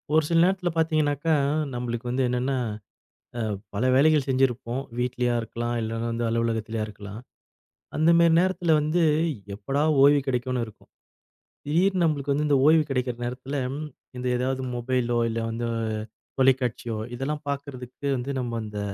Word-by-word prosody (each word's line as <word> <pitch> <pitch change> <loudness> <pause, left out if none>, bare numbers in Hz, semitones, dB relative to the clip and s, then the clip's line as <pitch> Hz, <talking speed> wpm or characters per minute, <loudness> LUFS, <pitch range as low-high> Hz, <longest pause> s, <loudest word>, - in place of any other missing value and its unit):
ஒரு 160 - +5
சில 165 0 +4
நேரத்துல 185 -1 +1
பாத்தீங்கன்னாக்க, 155 -2 +1 0.5
நம்மளுக்கு 120 0 -3
வந்து 130 +2 +1
என்னன்னா 125 +2 0 1.2
பல 105 +5 0
வேலைகள் 150 +1 +4
செஞ்சிருப்போம். 130 -1 +1 0.2
வீட்டிலயா 125 0 0
இருக்கலாம், 120 +1 -3
இல்ல 115 +1 -3
வந்து 115 +1 -2
அலுவலகத்துலயா 115 -1 -1
இருக்கலாம். 105 0 -9 0.8
அந்த 155 +2 +3
மாரி 170 -1 +5
நேரத்துல 180 -2 +2
வந்து 155 +3 +1 0.5
எப்படா 135 +8 -1 0.2
ஓய்வு 145 +1 +7
கிடைக்கும்னு 125 -1 -1
இருக்கும். 110 - -16 0.8
திடீர்னு 180 +5 +2
நம்மளுக்கு 145 -3 +1
வந்து 150 +2 0
இந்த 145 -2 +4
ஓய்வு 155 +1 +6
கிடைக்கிற 125 -2 -1
நேரத்துல 130 +3 -4 0.6
இந்த 125 0 -3
ஏதாவது 130 +1 -1
மொபைளோ, 120 -1 0
இல்ல 115 0 -2
வந்து 115 +1 -3 0.7
தொலைக்காட்சி, 130 -3 +2 0.3
இதெல்லாம் 145 +4 -3
பார்க்கறதுக்கு 140 -1 -5
வந்து 125 +3 -3
நம்ம 120 -2 -3
இந்த 105 -1 -6
130 Hz, 135 wpm, -25 LUFS, 120-150 Hz, 1.2 s, ஓய்வு